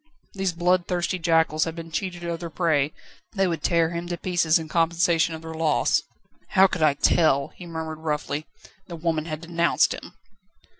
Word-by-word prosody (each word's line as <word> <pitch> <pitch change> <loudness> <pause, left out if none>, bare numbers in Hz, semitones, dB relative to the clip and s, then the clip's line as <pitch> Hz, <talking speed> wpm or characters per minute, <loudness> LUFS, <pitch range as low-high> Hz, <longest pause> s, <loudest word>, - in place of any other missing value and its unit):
These 195 -2 -1
bloodthirsty 180 +1 0
jackals 165 -2 +2
had 165 -1 -5
been 165 -1 -8
cheated 175 0 -4
of 170 -1 -3
their 170 0 -6
prey; 155 -3 +1 0.4
they 195 -2 +2
would 170 -4 -2
tear 165 +1 +2
him 170 0 -4
to 175 0 -3
pieces 175 -3 +2
in 160 -1 -5
compensation 165 0 +2
of 160 - -10
their 160 0 -7
loss. 160 -2 +2 0.5
"How 190 0 +7
could 185 -3 -1
I 150 -2 +4
tell?" 140 -2 +3
he 175 - -12
murmured 160 -1 -5
roughly, 150 -1 -3 0.4
"the 170 - -7
woman 160 -1 -1
had 155 -1 -5
denounced 170 0 +2
him." - - -10
165 Hz, 180 wpm, -24 LUFS, 160-175 Hz, 0.5 s, How